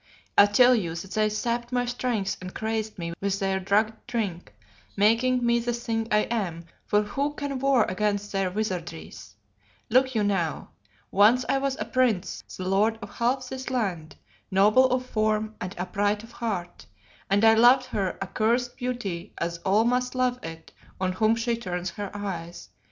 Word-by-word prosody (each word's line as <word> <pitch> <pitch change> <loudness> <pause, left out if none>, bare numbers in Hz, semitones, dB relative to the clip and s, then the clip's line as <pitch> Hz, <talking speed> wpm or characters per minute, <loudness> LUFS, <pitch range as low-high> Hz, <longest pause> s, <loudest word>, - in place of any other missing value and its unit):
I 205 - +8
tell 245 +5 +6
you 175 -9 -1
that 185 +3 -7
they 215 +1 +2
sapped 235 +3 -2
my 245 0 +1
strength 240 -5 -1
and 185 0 -8
crazed 220 -1 -3
me 170 -1 -4
with 200 0 0
their 195 -1 0
drugged 215 +4 0
drink, 210 -8 -3 0.5
making 240 +4 +3
me 235 0 +3
the 240 +1 -2
thing 225 -1 -2
I 210 0 +4
am, 185 -9 -3 0.2
for 210 0 +3
who 280 +8 -2
can 285 -3 -3
war 270 -3 +4
against 205 +1 -1
their 195 -1 0
wizardries? 175 - -5 0.6
Look 260 +1 +3
you 215 - +2
now. 190 -6 -1 0.4
Once 220 +6 +5
I 275 - +2
was 275 -1 -1
a 210 - -2
prince, 230 -6 0
the 185 - -4
lord 210 +4 +2
of 205 - -8
half 250 +2 0
this 260 +1 -6
land, 190 -11 -2 0.3
noble 210 +7 +5
of 255 0 -1
form 215 -2 0
and 185 +2 -5
upright 205 +4 -1
of 230 - -13
heart, 200 -8 -5 0.4
and 200 +3 +3
I 225 - +8
loved 245 +3 +6
her 195 -6 -2
accursed 235 +5 0
beauty 240 -9 -4
as 170 0 -3
all 200 +5 +2
must 250 +2 0
love 250 -1 +1
it 165 0 -9 0.3
on 185 -1 0
whom 215 +4 +2
she 230 +1 0
turns 180 -5 -4
her 205 +1 -5
eyes. 175 -4 -6
215 Hz, 175 wpm, -26 LUFS, 190-245 Hz, 0.6 s, I